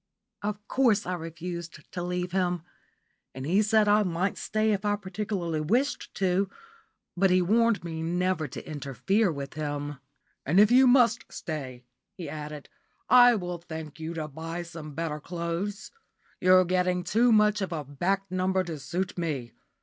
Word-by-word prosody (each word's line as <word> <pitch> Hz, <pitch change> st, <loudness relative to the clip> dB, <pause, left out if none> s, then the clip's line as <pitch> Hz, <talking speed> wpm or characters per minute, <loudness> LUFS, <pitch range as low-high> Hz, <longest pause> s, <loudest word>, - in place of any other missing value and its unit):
Of 210 Hz, 0 st, -4 dB
course 235 Hz, -6 st, +2 dB
I 180 Hz, -, -2 dB
refused 170 Hz, 0 st, -6 dB
to 175 Hz, -, -4 dB
leave 180 Hz, 0 st, -2 dB
him, 180 Hz, -2 st, 0 dB, 0.7 s
and 130 Hz, 0 st, -5 dB
he 185 Hz, +7 st, +3 dB
said 215 Hz, 0 st, +3 dB
I 210 Hz, +1 st, +5 dB
might 185 Hz, 0 st, 0 dB
stay 215 Hz, +1 st, 0 dB
if 205 Hz, 0 st, -1 dB
I 205 Hz, 0 st, +2 dB
particularly 190 Hz, -5 st, -3 dB
wished 245 Hz, -, 0 dB
to, 190 Hz, 0 st, +1 dB, 0.7 s
but 190 Hz, +2 st, +3 dB
he 180 Hz, 0 st, +4 dB
warned 225 Hz, +4 st, +2 dB
me 160 Hz, -2 st, -5 dB
never 175 Hz, -1 st, 0 dB
to -, -, -9 dB
interfere 150 Hz, -, 0 dB
with 140 Hz, -2 st, -6 dB
him. 145 Hz, -2 st, -4 dB, 0.4 s
"And 160 Hz, +7 st, +3 dB
if 210 Hz, +2 st, +6 dB
you 260 Hz, +1 st, +7 dB
must 245 Hz, -2 st, +4 dB
stay," 130 Hz, -6 st, -6 dB, 0.3 s
he 175 Hz, -4 st, -7 dB
added, 150 Hz, 0 st, -7 dB, 0.4 s
"I 245 Hz, -1 st, +8 dB
will 180 Hz, -4 st, -4 dB
thank 160 Hz, -2 st, -8 dB
you 160 Hz, +1 st, -5 dB
to 155 Hz, -2 st, -3 dB
buy 165 Hz, +4 st, -5 dB
some 160 Hz, -4 st, -9 dB
better 160 Hz, -2 st, -3 dB
clothes. 170 Hz, +5 st, -4 dB, 0.5 s
You're 185 Hz, 0 st, +6 dB
getting 180 Hz, 0 st, +1 dB
too 230 Hz, +7 st, +3 dB
much 210 Hz, -1 st, +4 dB
of 190 Hz, -, -2 dB
a 155 Hz, -3 st, -3 dB
back 175 Hz, +8 st, -1 dB
number 185 Hz, 0 st, +1 dB
to 165 Hz, -4 st, -6 dB
suit 180 Hz, +6 st, -3 dB
me. 140 Hz, -8 st, -3 dB
180 Hz, 165 wpm, -28 LUFS, 160-205 Hz, 0.7 s, I